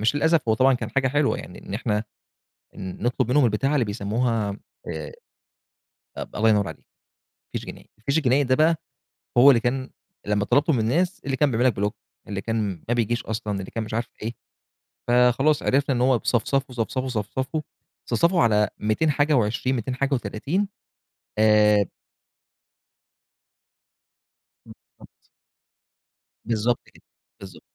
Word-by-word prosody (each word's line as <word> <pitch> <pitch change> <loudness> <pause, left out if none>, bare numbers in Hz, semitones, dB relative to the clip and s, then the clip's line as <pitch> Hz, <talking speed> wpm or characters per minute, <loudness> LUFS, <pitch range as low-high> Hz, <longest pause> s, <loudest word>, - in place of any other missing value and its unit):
مش 110 +6 +2
للأسف 160 +1 +3
هو 110 - +4
طبعًا 130 +3 +4
كان - - -4
حاجة 135 -1 +1
حلوة 145 +1 +1
يعني 90 - -10
إن 100 - -5
إحنا 105 -1 -1 0.7
ن 95 +2 -7
نطلب 120 0 0
منهم 145 0 +4
البتاعة 120 +6 +1
اللي 130 -5 +2
بيسموها 105 0 -1 0.3
آآ، 80 -3 -5 1.0
أب - - -7
الله 110 +1 +3
ينور 105 -2 +3
عليك، - - -11 0.7
فيش - - -4
جنائي. - - -11
الفيش 140 +8 0
الجنائي 140 0 +3
ده 130 0 +2
بقى 160 +3 +3 0.6
هو 135 +4 +9
اللي 120 - +4
كان 130 +3 -2 0.4
لمّا 105 0 0
طلبته 155 - +3
من 125 - +1
الناس، 170 - 0
اللي 135 -1 -1
كان 145 0 +3
بيعمل 120 +3 +1
لك 125 - +4
بلوك 105 +1 -2 0.3
اللي 100 -1 -4
كان 105 -5 -2
ما 120 - +3
بيجيش 120 0 0
أصلًا، 105 -2 -3
اللي 95 - -7
كان 115 - -3
مش 110 - -8
عارف 115 +1 -2
إيه. 115 +2 -3 0.7
فخلاص 125 +5 +3
عرفنا 135 -1 +2
إن 120 - 0
هو 130 -1 +4
ب - - -22
صفصفوا، 130 +2 0
صفصفوا، 130 +3 -2
صفصفوا، 130 +7 -3 0.5
صفصفوا 170 0 +3
على 105 -2 +3
200 110 +9 +1
حاجة 145 +2 +2
و20 120 +1 +1
200 125 +1 -3
حاجة 140 +1 0
و30 135 - -1 0.7
آآ 105 -1 +5 2.8
بالضبط. - - -19 1.2
بالضبط 115 +1 0
كده، - - -22 0.4
بالضبط. 95 -3 -11
120 Hz, 150 wpm, -24 LUFS, 105-135 Hz, 2.8 s, هو